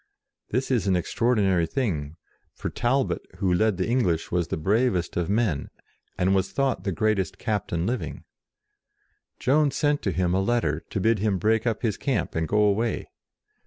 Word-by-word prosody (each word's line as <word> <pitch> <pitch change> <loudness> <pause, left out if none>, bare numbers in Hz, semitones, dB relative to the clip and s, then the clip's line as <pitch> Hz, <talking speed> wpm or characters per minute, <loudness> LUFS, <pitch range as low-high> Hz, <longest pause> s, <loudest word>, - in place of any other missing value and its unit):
This 130 +4 -1
is 115 -7 +1
an 95 - +3
extraordinary 95 -3 +1
thing, 80 - -2 0.4
for - - -4
Talbot, 130 +2 0 0.2
who 95 -2 +1
led 105 +1 +2
the 90 - -1
English, 100 -10 0
was 85 -2 0
the - - -2
bravest 100 +2 +1
of 85 0 -1
men, 100 -9 0 0.5
and 95 +1 +2
was 95 -1 +1
thought 135 -3 0
the 100 - 0
greatest 100 -1 0
captain 100 -7 -2
living. 125 +3 -3 1.2
Jeanne 145 +3 +3
sent 145 +1 +1
to 95 - -1
him 90 -1 0
a 95 - +2
letter 95 -8 +1
to - - -2
bid 110 +2 +2
him 100 -1 +1
break 110 +4 +1
up 115 0 -1
his 110 -4 0
camp 135 - -1
and 80 0 -1
go 105 +4 +3
away. 105 +3 0
105 Hz, 170 wpm, -25 LUFS, 90-120 Hz, 1.2 s, an